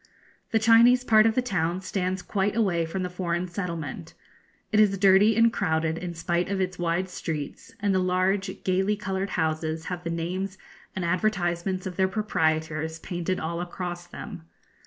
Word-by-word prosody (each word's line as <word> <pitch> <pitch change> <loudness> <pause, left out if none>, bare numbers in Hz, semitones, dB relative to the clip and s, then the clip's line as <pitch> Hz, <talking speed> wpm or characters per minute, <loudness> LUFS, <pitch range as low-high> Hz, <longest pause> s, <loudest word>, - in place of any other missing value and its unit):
The 225 - +2
Chinese 230 +3 +6
part 220 -2 +5
of 225 - +1
the 255 - +2
town 180 -6 -1
stands 185 -1 -2
quite 200 0 0
away 185 -7 +2
from 185 +3 -3
the - - -1
foreign 180 -1 -2
settlement. 170 - -5 0.6
It 215 - +3
is 200 -2 +4
dirty 195 +3 +5
and 230 0 +4
crowded 160 -4 0
in 175 -1 -5
spite 175 +2 -1
of 200 -1 -1
its 185 -1 -2
wide 175 +2 0
streets, 155 -5 -6
and 205 -1 +1
the 190 - +3
large, 185 +2 0
gaily 190 +3 +1
coloured 195 -1 -3
houses 160 0 -1
have 175 0 -6
the 170 - -3
names 185 +4 -3 0.4
and 185 - -2
advertisements 180 0 0
of 185 -2 -5
their 190 -1 +3
proprietors 160 -6 -1
painted 175 +2 -3
all 170 +2 -3
across 175 0 -5
them. 170 - -8
185 Hz, 170 wpm, -26 LUFS, 170-195 Hz, 0.6 s, Chinese